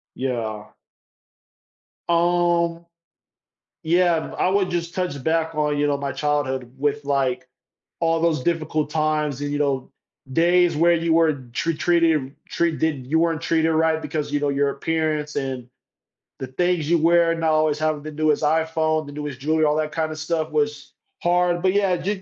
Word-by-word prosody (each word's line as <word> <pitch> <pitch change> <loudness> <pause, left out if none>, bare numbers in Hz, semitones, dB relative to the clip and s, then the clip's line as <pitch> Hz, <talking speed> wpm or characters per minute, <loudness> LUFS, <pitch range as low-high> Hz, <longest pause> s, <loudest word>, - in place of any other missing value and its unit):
Yeah. 115 -5 -4 1.4
Um, 170 0 +1 1.0
yeah, 170 0 +3
b - - -8
I - - +2
would 195 -1 +1
just 170 -1 -3
touch 180 -7 -2
back 160 0 0
on, 150 -1 0
you 145 0 +1
know, 140 -1 +1
my 140 -1 -3
childhood 135 -3 -2
with, 145 +1 -1
like, 130 -2 0 0.5
all 165 0 +1
those 160 -6 +1
difficult 155 -2 -1
times 150 -2 -1
and, 145 0 -3
you 145 - -2
know, 140 -3 -1 0.4
days 175 +2 +3
where 170 +2 +4
you 165 0 0
were 160 -2 +4 0.2
tr 165 - 0
treated 160 -4 +1
treated 160 -5 -1
you 155 +4 +1
weren't 165 -2 +1
treated 160 -1 +1
right, 160 0 +2
because, 150 -2 -4
you 145 - +1
know, 145 0 0
your 140 0 +1
appearance, 155 0 -2
and 130 -3 -3 0.7
the 130 - -5
things 170 +3 0
you 170 - +4
wear, 170 +1 +4
and 165 0 -3
not 160 -1 +2
always 155 -1 +2
having 155 -2 -1
the 155 - -6
newest 155 0 +1
iPhone, 160 0 +1
the 145 - -9
newest 150 -3 -6
jewelry, 155 +3 +1
all 150 0 +2
that 155 0 -1
kind 160 -1 -2
of 155 - -7
stuff, 160 0 -2
was 150 -1 -2 0.3
hard, 175 0 +2
but, 185 0 +2
yeah, 200 -2 +2
y 195 +2 -3
155 Hz, 175 wpm, -22 LUFS, 145-165 Hz, 1.4 s, where